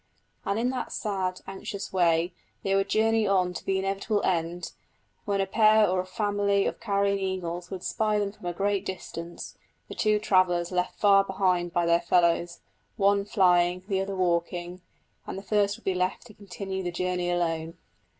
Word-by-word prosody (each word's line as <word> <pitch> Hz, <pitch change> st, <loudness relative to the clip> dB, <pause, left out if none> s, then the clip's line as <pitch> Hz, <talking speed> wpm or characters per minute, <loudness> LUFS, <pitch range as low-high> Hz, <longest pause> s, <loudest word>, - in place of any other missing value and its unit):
And 200 Hz, -, 0 dB
in 245 Hz, +3 st, +1 dB
that 255 Hz, -2 st, -4 dB
sad, 190 Hz, -4 st, -2 dB
anxious 195 Hz, +1 st, -6 dB
way 170 Hz, -1 st, +2 dB, 0.3 s
they 195 Hz, -, 0 dB
would 195 Hz, 0 st, +1 dB
journey 220 Hz, 0 st, +2 dB
on 185 Hz, -2 st, +2 dB
to -, -, -7 dB
the 195 Hz, -, 0 dB
inevitable 195 Hz, +2 st, -1 dB
end, 170 Hz, 0 st, -1 dB, 0.5 s
when 200 Hz, -1 st, 0 dB
a 195 Hz, -, +2 dB
pair 215 Hz, +1 st, +5 dB
or 185 Hz, 0 st, 0 dB
family 200 Hz, 0 st, +1 dB
of -, -, -2 dB
carrion 200 Hz, -3 st, +1 dB
eagles 180 Hz, -2 st, -3 dB
would 190 Hz, -2 st, -6 dB
spy 215 Hz, -1 st, 0 dB
them 205 Hz, -1 st, -1 dB
from 190 Hz, -3 st, -10 dB
a -, -, 0 dB
great 200 Hz, +2 st, 0 dB
distance 175 Hz, -3 st, -7 dB, 0.3 s
the -, -, -6 dB
two 215 Hz, -1 st, +2 dB
travellers 185 Hz, -4 st, +2 dB
left 180 Hz, 0 st, -1 dB
far 200 Hz, -1 st, +5 dB
behind 185 Hz, -3 st, 0 dB
by 175 Hz, 0 st, +1 dB
their 170 Hz, 0 st, +3 dB
fellows, 170 Hz, 0 st, +2 dB, 0.4 s
one 200 Hz, 0 st, +3 dB
flying, 180 Hz, -3 st, +3 dB
the 195 Hz, -2 st, 0 dB
other 195 Hz, 0 st, -3 dB
walking; 175 Hz, 0 st, -1 dB, 0.5 s
and -, -, -5 dB
the 195 Hz, -, -7 dB
first 205 Hz, 0 st, +1 dB
would 230 Hz, -, -21 dB
be 190 Hz, -, +1 dB
left 185 Hz, +4 st, -1 dB
to 225 Hz, -, -14 dB
continue 195 Hz, -1 st, -6 dB
the 180 Hz, -, -2 dB
journey 180 Hz, 0 st, -1 dB
alone. 165 Hz, -1 st, -1 dB
190 Hz, 180 wpm, -27 LUFS, 175-200 Hz, 0.5 s, pair